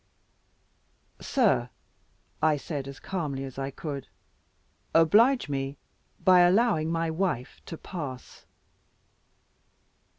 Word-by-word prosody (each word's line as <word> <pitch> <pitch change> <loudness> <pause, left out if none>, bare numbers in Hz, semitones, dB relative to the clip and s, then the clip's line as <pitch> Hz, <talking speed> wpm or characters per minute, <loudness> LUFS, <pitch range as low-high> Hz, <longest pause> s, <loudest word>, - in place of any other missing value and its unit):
"Sir," 140 - +2 0.7
I 155 -1 +3
said, 140 -1 -5
as 140 -1 -9
calmly 150 -8 -3
as 135 0 -7
I 135 0 -2
could, 140 -1 -6 0.9
"oblige 220 - +5
me 135 0 -3 0.4
by 185 -1 +6
allowing 175 -3 +3
my 165 -1 0
wife 160 -7 -2
to 165 - -6
pass." 145 -10 -8
155 Hz, 95 wpm, -27 LUFS, 135-180 Hz, 0.9 s, by